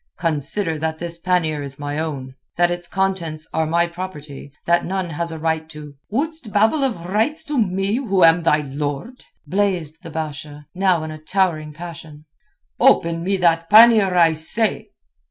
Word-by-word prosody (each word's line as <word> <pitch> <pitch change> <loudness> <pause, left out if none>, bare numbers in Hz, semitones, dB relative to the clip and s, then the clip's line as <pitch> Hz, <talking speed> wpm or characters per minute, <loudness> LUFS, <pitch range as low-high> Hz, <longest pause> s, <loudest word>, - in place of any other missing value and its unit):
"Consider 160 +1 -1
that 160 0 -2
this 170 0 -5
pannier 165 -4 0
is 140 -1 -7
my 145 +1 -4
own. 140 -5 -4 0.2
That 175 0 +3
its 175 0 -2
contents 170 -5 -2
are 160 0 0
my 170 +2 +2
property; 155 -6 -8
that 170 0 +3
none 185 -2 -3
has 170 +2 -3
a 160 - -6
right 160 0 -2
to...." 150 -2 -10 0.2
"Wouldst 285 +1 -3
babble 220 +8 +3
of 215 -11 -2
rights 225 - 0
to 295 -4 -2
me, 195 +2 0
who 195 -9 +1
am 165 +1 +6
thy 155 -2 +3
lord?" 145 - -5 0.2
blazed 175 -3 -1
the 170 - -9
Basha, 150 -2 -6
now 185 -3 +2
in 155 - -5
a 155 - -8
towering 160 -3 0
passion. 155 -2 -10 0.5
"Open 165 0 +3
me 195 +2 0
that 165 -2 +2
pannier, 215 -3 +7
I 165 -2 +5
say." 205 +8 -1
170 Hz, 170 wpm, -20 LUFS, 155-190 Hz, 0.5 s, pannier